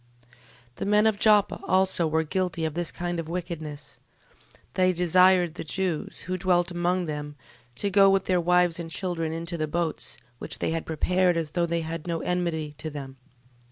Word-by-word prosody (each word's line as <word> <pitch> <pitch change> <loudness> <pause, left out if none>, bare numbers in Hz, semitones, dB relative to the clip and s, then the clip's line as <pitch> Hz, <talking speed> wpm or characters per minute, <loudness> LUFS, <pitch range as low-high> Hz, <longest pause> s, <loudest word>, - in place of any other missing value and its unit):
12:3. 120 - -29 0.5
The - - -3
men 210 +1 +4
of 220 -2 +2
Joppe 210 -2 +4
also 185 -3 +2
were 160 +1 +1
guilty 170 0 -2
of 155 - -2
this 175 0 -2
kind 175 -1 -3
of 165 -1 -5
wickedness: 160 -5 -6 0.7
they 185 0 +3
desired 180 0 +4
the - - -6
Jews, 175 0 -2
who 185 +1 -4
dwelt 175 -1 +2
among 175 +1 0
them, 150 -1 -5 0.4
to 200 +11 -2
go 195 0 +6
with 195 -1 +2
their 180 -2 +2
wives 180 -1 +3
and 165 -1 -5
children 165 -3 -2
into 170 +1 -4
the 155 - 0
boats, 170 0 -3 0.2
which - - -3
they - - -1
had 165 0 -3
prepared, 180 +2 +1
as 160 -2 -2
though 170 0 0
they 170 0 0
had 165 +1 -5
no 165 -2 -2
enmity 170 -4 -2
to 155 - -4
them. 135 -3 -8
175 Hz, 190 wpm, -26 LUFS, 160-185 Hz, 0.7 s, go